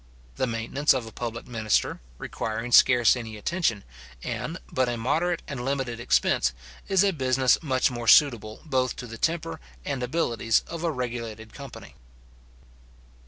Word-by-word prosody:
The 130 - +1
maintenance 120 +5 +1
of 125 -3 -2
a 110 - -9
public 115 0 -5
minister, 110 -3 0 0.2
requiring 115 - -4
scarce 120 -2 +6
any 110 -3 -6
attention, 115 - -1 0.4
and - - -4
but 130 -1 +1
a 120 - -2
moderate 165 +9 0
and 135 -4 -5
limited 130 -3 -2
expense, 65 - +2 0.3
is 195 0 +4
a 200 -1 +2
business 130 -3 +2
much 130 -5 +1
more 120 -1 -5
suitable 115 -6 +4
both 130 -4 0
to 125 - -7
the 115 -1 -9
temper 165 -1 -1 0.3
and 140 -3 -2
abilities 120 -5 +1
of 170 0 -6
a 170 - +1
regulated 115 -5 -5
company. 140 -3 -10
125 Hz, 150 wpm, -26 LUFS, 115-140 Hz, 0.4 s, scarce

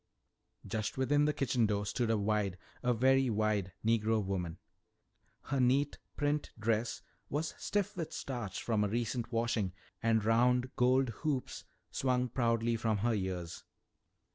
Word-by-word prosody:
Just 110 +2 -3
within 145 +3 +3
the 150 - +3
kitchen 125 -5 +1
door 105 -1 0
stood 115 +3 -1
a 115 - +3
wide, 100 -2 0 0.2
a 125 - +2
very 130 +2 +4
wide, 105 -3 +1
Negro 110 -2 +2
woman. 90 -4 -2 0.9
Her 135 0 -1
neat 135 +3 +2 0.2
print 145 0 0
dress 110 +1 0 0.3
was 155 +3 -2
stiff 205 -2 -1
with 165 -4 -4
starch 120 -8 -4
from 110 -3 +1
a - - +2
recent 120 +2 -2
washing, 115 -5 0 0.3
and 110 -2 +2
round 125 +3 +3
gold 130 +1 +3
hoops 145 -5 -2 0.3
swung 125 -1 +1
proudly 115 -1 +1
from 110 -1 +1
her 115 +3 +1
ears. 90 -4 -3
115 Hz, 140 wpm, -33 LUFS, 105-130 Hz, 0.9 s, very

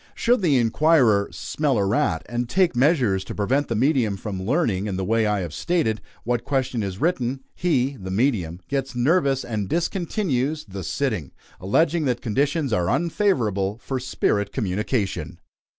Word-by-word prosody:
Should 240 -1 +2
the 155 -7 +3
inquirer 120 -4 +3
"smell 145 -5 -1
a 100 - +2
rat," 120 +10 0
and 120 0 -3
take 185 -5 +2
measures 125 - +2
to - - -7
prevent 130 +8 +1
the 115 - -2
medium 120 -4 +2
from 95 -2 -5
learning, 105 - 0
in 100 - -2
the 95 - -2
way 110 +2 +2
I 105 -2 0
have 85 -4 -5
stated, 150 - 0 0.2
what 120 0 -1
question 130 -4 -1
is 95 -2 -4
written, 135 -6 0
he 140 -6 0
(the 95 -2 -7
medium) 95 - 0
gets 135 -2 -2
nervous 135 +1 +2
and 105 -5 -3
discontinues 165 - -1
the 95 -1 -6
"sitting," - - -2 0.3
alleging 155 - +1
that 125 -2 0
conditions 140 +3 0
are 90 -1 +1
unfavorable 120 - +1
for 130 +2 -4
spirit 105 -5 0
communication. 100 - -2
120 Hz, 160 wpm, -23 LUFS, 100-145 Hz, 0.3 s, the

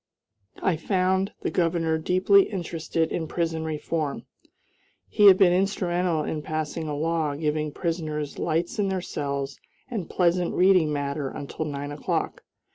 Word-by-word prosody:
I 175 -4 +2
found 190 +2 +1
the - - -2
Governor 165 -2 +1
deeply 185 +4 +4
interested 165 -3 -2
in 160 -2 -2
prison 165 -1 -2
reform. 155 -1 -3 0.8
He 210 -2 +5
had 190 -2 +9
been 185 -3 +5
instrumental 180 -3 +1
in 155 0 -3
passing 155 +1 -3
a 150 - -2
law 160 -1 0
giving 150 0 -1
prisoners 155 -3 -3
lights 170 +5 -1
in 200 - +2
their 190 -1 -1
cells 140 -4 -4 0.3
and 200 -9 -4
pleasant 175 -1 +1
reading 180 -4 +4
matter 140 -1 -2
until 145 +3 -5
nine 145 -1 -4
o'clock. 145 - -2
165 Hz, 140 wpm, -25 LUFS, 150-180 Hz, 0.8 s, had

